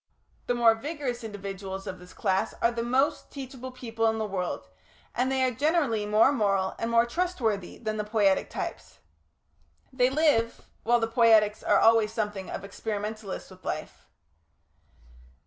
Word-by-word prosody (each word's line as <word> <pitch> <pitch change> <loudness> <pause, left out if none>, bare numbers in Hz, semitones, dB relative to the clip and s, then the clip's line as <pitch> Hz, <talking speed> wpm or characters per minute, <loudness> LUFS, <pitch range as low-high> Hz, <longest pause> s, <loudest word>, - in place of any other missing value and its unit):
The 245 - +1
more 235 -1 +6
vigorous 255 -1 -4
individuals 195 -2 -6
of 185 - -6
this 180 0 -14
class 195 +1 -1
are 235 - +3
the 235 -1 -3
most 265 +5 +1
teachable 260 -2 -7
people 225 -3 -2
in 220 0 +1
the 220 - -1
world, 190 -3 -3 0.5
and 255 +2 0
they 265 -1 +1
are 255 - +2
generally 270 -5 +1
more 215 +5 +5
moral 195 -7 +1
and 230 - -1
more 230 0 +4
trustworthy 235 - -2
than 215 -2 -3
the 210 - -1
Poietic 210 -3 +2
types. - - -6 1.0
They 250 -1 +3
live, 270 -6 +1 0.2
while 240 +1 +3
the 225 - 0
Poietics 225 -2 +4
are 205 - +3
always 225 0 +5
something 210 -4 -3
of - - -5
experimentalists 210 0 -5
with - - -15
life. - - -5
225 Hz, 155 wpm, -27 LUFS, 210-250 Hz, 1.0 s, more